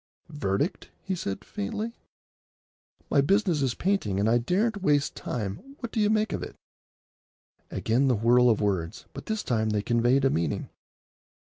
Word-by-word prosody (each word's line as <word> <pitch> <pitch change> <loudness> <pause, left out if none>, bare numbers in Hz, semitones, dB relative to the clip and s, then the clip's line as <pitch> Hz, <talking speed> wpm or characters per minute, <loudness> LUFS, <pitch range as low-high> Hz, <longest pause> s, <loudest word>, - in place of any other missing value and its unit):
"Verdict?" 145 - -2
he 190 - -2
said 100 - -4
faintly. 210 - -4 1.2
"My 140 - +5
business 185 -1 +2
is 130 -3 0
painting, 180 - 0
and 105 - +2
I 120 +2 +4
daren't 200 - 0
waste 145 -6 +2
time. 100 -5 -3 0.2
What 235 -3 -5
do - - -2
you 210 -1 +3
make 215 0 +1
of - - -3
it?" - - -7 1.1
Again 125 +5 +1
the 130 - +3
whirl 120 +3 +4
of 110 - +3
words, 85 -6 -1
but - - -9
this 220 -1 -2
time 110 -3 0
they 105 -1 0
conveyed 120 +4 +3
a 135 - +4
meaning. 80 -3 -1
125 Hz, 160 wpm, -27 LUFS, -, 1.2 s, My